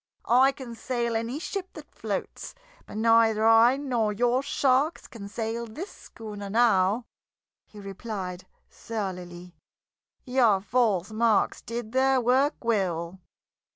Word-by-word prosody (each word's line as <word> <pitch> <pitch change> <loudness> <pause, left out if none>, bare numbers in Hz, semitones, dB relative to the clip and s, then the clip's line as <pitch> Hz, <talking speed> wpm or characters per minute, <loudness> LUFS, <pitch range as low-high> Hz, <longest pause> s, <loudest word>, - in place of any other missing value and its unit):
"I 260 +3 +5
can 260 -3 -9
sail 235 0 -2
any 230 +4 -2
ship 375 +3 -5
that - - -12
floats, - - -5 0.3
but - - -8
neither 225 -1 +4
I 225 +3 +6
nor 245 -7 -1
your 245 +4 +1
sharks 280 +1 +1
can 205 -4 -10
sail 225 +2 -4
this 315 - -8
schooner 210 -3 -9
now," 220 0 +2 0.6
he 210 - -14
replied 195 -2 -6 0.2
surlily. 180 -5 -6 0.7
"Your 245 -6 +3
false 210 -2 0
marks 220 -1 +1
did 230 -1 -6
their 265 +1 +3
work 260 +5 +2
well." 185 -5 -1
230 Hz, 120 wpm, -26 LUFS, 205-250 Hz, 0.7 s, I